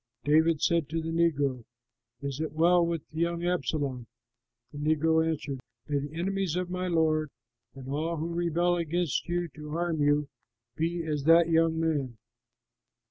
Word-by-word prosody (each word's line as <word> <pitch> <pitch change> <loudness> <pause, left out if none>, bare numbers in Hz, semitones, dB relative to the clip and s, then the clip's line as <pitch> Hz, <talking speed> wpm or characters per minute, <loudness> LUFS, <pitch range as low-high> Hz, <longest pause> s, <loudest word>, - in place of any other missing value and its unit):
'" - - -53
David 155 +1 +3
said 170 -4 +2
to 165 +1 -1
the 165 0 -3
negro, 145 -7 +1 0.6
"Is 140 0 -4
it 155 -2 -3
well 170 +2 +4
with 170 -3 -2
the 160 - -6
young 170 0 0
Absalom?" 145 -8 -1 0.6
The 145 - -8
negro 160 +2 +2
answered, 150 -4 -3 0.3
"May 145 -1 0
the 145 +2 -6
enemies 195 -2 -1
of 180 0 -2
my 185 0 -2
lord 155 -3 +2 0.5
and 130 -1 -10
all 155 +4 -2
who 165 +2 -3
rebel 175 +1 +1
against 170 -1 -1
you 175 0 0
to 150 0 -10
harm 170 -2 -1
you 145 0 +3 0.5
be 165 +3 -1
as 150 -3 -2
that 165 +1 +6
young 165 0 +3
man!" 145 -7 -1
160 Hz, 165 wpm, -28 LUFS, 150-170 Hz, 0.6 s, that